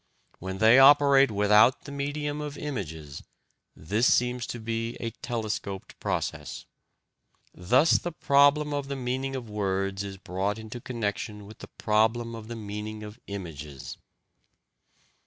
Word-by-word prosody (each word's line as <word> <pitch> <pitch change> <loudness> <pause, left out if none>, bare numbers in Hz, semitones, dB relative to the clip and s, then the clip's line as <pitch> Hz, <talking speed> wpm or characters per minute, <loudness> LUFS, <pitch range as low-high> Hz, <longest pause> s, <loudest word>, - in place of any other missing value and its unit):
When 95 +1 -5
they 110 +5 +6
operate 140 -1 +7
without 105 +4 +4
the 140 - -9
medium 145 +1 -3
of 150 -1 -6
images, 80 - -6 0.5
this 105 +10 +1
seems 125 0 +1
to 120 - -5
be 115 +1 -3
a 115 - -4
telescoped 105 -5 -5
process. - - -3 0.9
Thus 125 - +3
the 175 - -4
problem 145 0 +3
of 145 -1 -2
the 140 - -3
meaning 130 +1 -3
of 125 -3 -5
words 100 -1 -2
is 100 -1 -7
brought 95 +2 -2
into 110 +2 -8
connection 105 -3 -4
with 110 +2 -13
the - - -10
problem 110 +2 +1
of 110 -1 -8
the 120 - -6
meaning 105 0 -6
of 105 +3 -10
images. 75 -9 -7
110 Hz, 140 wpm, -27 LUFS, 100-135 Hz, 0.9 s, operate